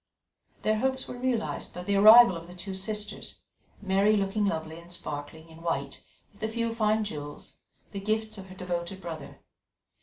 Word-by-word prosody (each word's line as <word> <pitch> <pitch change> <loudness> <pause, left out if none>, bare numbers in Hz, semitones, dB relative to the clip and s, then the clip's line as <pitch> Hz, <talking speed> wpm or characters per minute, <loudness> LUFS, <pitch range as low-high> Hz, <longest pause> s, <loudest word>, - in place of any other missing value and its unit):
Their 215 0 +2
hopes 260 +1 0
were - - -6
realized 245 -3 -2
by 180 - -5
the 200 +2 0
arrival 215 0 +9
of 165 0 -8
the 180 - -11
two 190 +2 -5
sisters, 210 +2 -4 0.4
Mary 200 +2 +4
looking 200 +1 +1
lovely 160 -2 -3
and 170 +1 -13
sparkling 155 -1 -7
in 160 0 -13
white 140 -5 -3 0.3
with 200 - -20
a 220 - -1
few 230 0 -1
fine 215 -1 +2
jewels, 145 -7 -7 0.3
the 200 - -4
gifts 215 +1 -1
of 190 - -9
her 185 - -11
devoted 180 0 -4
brother. 165 -5 -8
195 Hz, 175 wpm, -28 LUFS, 170-215 Hz, 0.4 s, arrival